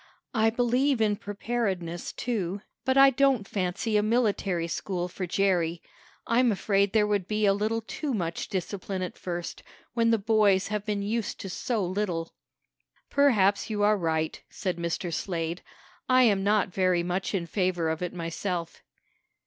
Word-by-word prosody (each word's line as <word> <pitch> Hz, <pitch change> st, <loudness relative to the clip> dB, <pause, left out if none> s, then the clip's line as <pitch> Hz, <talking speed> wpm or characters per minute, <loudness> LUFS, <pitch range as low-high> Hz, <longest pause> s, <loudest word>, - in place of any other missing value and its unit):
"I 225 Hz, -1 st, +3 dB
believe 245 Hz, +3 st, +2 dB
in 215 Hz, -2 st, +2 dB
preparedness, 200 Hz, -5 st, -3 dB
too, 200 Hz, -5 st, -3 dB, 0.2 s
but 265 Hz, 0 st, +2 dB
I 275 Hz, 0 st, +8 dB
don't 265 Hz, -5 st, +2 dB
fancy 195 Hz, +3 st, -1 dB
a -, -, +4 dB
military 205 Hz, -6 st, +1 dB
school 180 Hz, +1 st, -3 dB
for 180 Hz, 0 st, -5 dB
Jerry. 175 Hz, -3 st, +1 dB, 0.5 s
I'm 240 Hz, +1 st, +3 dB
afraid 200 Hz, 0 st, +1 dB
there 215 Hz, -1 st, +3 dB
would 205 Hz, -3 st, 0 dB
be 215 Hz, 0 st, +1 dB
a 195 Hz, -, +5 dB
little 215 Hz, +3 st, -1 dB
too 285 Hz, +6 st, -4 dB
much 170 Hz, -4 st, -3 dB
discipline 190 Hz, 0 st, -3 dB
at 180 Hz, -, -5 dB
first, 175 Hz, -1 st, -5 dB, 0.3 s
when 230 Hz, -1 st, +2 dB
the 225 Hz, -, +4 dB
boys 205 Hz, -3 st, +3 dB
have 210 Hz, 0 st, -3 dB
been 205 Hz, -1 st, -1 dB
used 220 Hz, +1 st, -2 dB
to 195 Hz, -, -6 dB
so 225 Hz, -1 st, -1 dB
little." 180 Hz, -3 st, -2 dB, 0.8 s
"Perhaps 215 Hz, -9 st, +3 dB
you 210 Hz, -1 st, -1 dB
are 210 Hz, +1 st, +5 dB
right," 160 Hz, -4 st, -1 dB
said 185 Hz, -3 st, -3 dB
Mr. 170 Hz, 0 st, -3 dB
Slade. 170 Hz, -1 st, -3 dB, 0.5 s
"I 255 Hz, 0 st, +6 dB
am 200 Hz, -5 st, +3 dB
not 205 Hz, -2 st, +2 dB
very 185 Hz, -2 st, +2 dB
much 180 Hz, +3 st, -2 dB
in 175 Hz, -3 st, -1 dB
favor 180 Hz, -2 st, 0 dB
of 160 Hz, +1 st, -2 dB
it 180 Hz, -, -2 dB
myself." 170 Hz, 0 st, -4 dB
200 Hz, 160 wpm, -27 LUFS, 180-220 Hz, 0.8 s, I